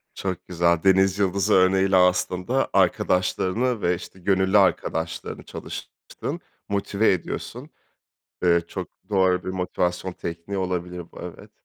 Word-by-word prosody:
Çok 95 -3 -4
güzel, 85 -1 +1
denizyıldızı 95 +1 +3
örneğiyle 95 +1 +4
aslında 90 +6 +2
arkadaşlarını 95 +5 +1
ve, 90 +1 +2
işte, 95 +2 -11
gönüllü 95 +2 +2
arkadaşlarını 80 -4 0
çalıştığın, - - -7 0.3
motive 100 +1 +1
ediyorsun, 90 - -5 0.7
eee, 85 -1 +4
çok - - -5 0.2
doğru 95 -3 +2
bir - - -4
motivasyon 90 0 -2
tekniği 85 +4 -5
olabilir 90 -2 -3
bu, - - -12
evet. - - -9
95 Hz, 115 wpm, -24 LUFS, 90-95 Hz, 0.7 s, örneğiyle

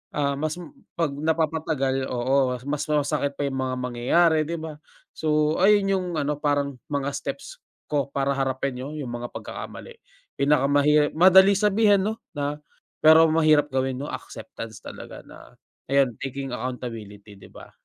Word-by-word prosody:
ah, 140 -1 0
mas 155 +1 -2
m 165 -5 -10 0.2
'pag 165 -4 0
napapatagal 155 -3 -1
oo, 130 +1 +1
mas 150 +1 -2
masakit 145 -1 0
pa 145 - -3
yung 135 -1 -3
mga 130 -1 -1
mangyayari, 130 +7 +2
di 170 - -3
ba? 155 -1 -7 0.4
So, 155 0 +1
ayun 200 +1 +4
yung 185 -2 0
ano, 145 0 -1
parang 145 -3 -1
mga 140 -1 -2
steps - - -6 0.3
ko 145 -2 0
para 140 0 0
harapin' 135 -1 -2
no 140 +4 -6
yung 145 -5 -5
mga 120 0 -5
pagkakamali. 475 - -8 0.4
Pinakamahi 145 +1 +3
madali 190 +3 +7
sabihin 205 -1 +3
'no 220 +1 -4 0.2
na 145 +1 -3 0.4
pero 160 +1 +8
mahirap 155 -2 +3
gawin 130 -1 0
'no, - - -4
acceptance 110 -2 -8
talaga - - -10
na - - -15 0.4
ayun, 135 -3 +3
taking 135 0 -5
accountability, 110 -5 -7
di - - -14
ba? - - -13
145 Hz, 150 wpm, -24 LUFS, 135-160 Hz, 0.4 s, pero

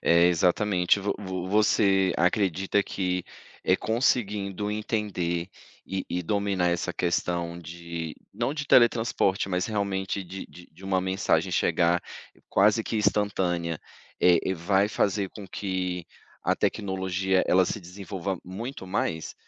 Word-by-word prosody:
É, 85 +1 +5
exatamente! 90 +2 +2
Vo 100 +1 0
vo 95 -2 -4
você 100 -2 +3
acredita 95 +2 +2
que, 90 -2 -2 0.4
eh, - - +4
conseguindo 105 -3 0
entender, 100 -5 -2 0.4
e 95 -1 -3
e 90 - -2
dominar 100 -1 +1
essa 85 +1 -1
questão 85 0 -1
de 85 -1 -6 0.2
não 120 +7 -1
de 145 -2 -3
teletransporte, 115 -6 +3
mas 90 0 0
realmente 100 -2 -2
de 95 +1 -8
de 90 - -15
de 95 - -15
uma 95 -1 +1
mensagem 95 +1 +1
chegar 85 0 +2 0.5
quase 105 +3 +3
que - - -4
instantânea, 90 -6 0 0.4
eh, 90 -1 +6
e 95 - 0
vai 95 +4 +2
fazer 100 -1 0
com 105 -3 -9
que 90 -3 -3 0.4
a - - +3
tecnologia, 95 -1 0
ela 95 +1 +5
se 105 - -3
desenvolva 95 0 -5
muito 100 +4 -6
mais? 80 -4 -2
95 Hz, 130 wpm, -27 LUFS, 90-100 Hz, 0.5 s, eh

